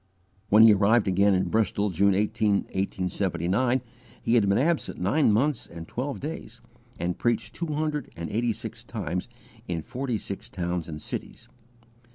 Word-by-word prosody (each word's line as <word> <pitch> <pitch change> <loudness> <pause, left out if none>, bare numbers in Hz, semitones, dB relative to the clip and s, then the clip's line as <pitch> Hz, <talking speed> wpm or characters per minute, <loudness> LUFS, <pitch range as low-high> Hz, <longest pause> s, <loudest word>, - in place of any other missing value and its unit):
When 105 +2 +7
he 110 -1 +9
arrived 105 +3 +3
again 100 +1 +4
in 95 - 0
Bristol, 105 -2 +1
June 100 +3 +3
18, 105 0 +1
1879, 95 +5 0 0.4
he 115 - +2
had 110 -5 +4
been 100 - +3
absent 160 +5 0
nine 110 - +3
months 130 +4 +1
and 85 -1 -9
twelve 135 +3 -4
days, 155 +4 -6 0.4
and 85 +1 -2
preached 120 0 0
two 170 - -4
hundred 150 -1 -2
and 85 0 -5
eighty 115 +2 +1
six - - -7
times 90 +4 -4 0.4
and 85 - -1
in 80 - -4
forty 125 - -3
six 100 -1 -7
towns 90 -2 -3
and 75 -1 -6
cities. 115 +9 -7
105 Hz, 165 wpm, -26 LUFS, 90-120 Hz, 0.4 s, he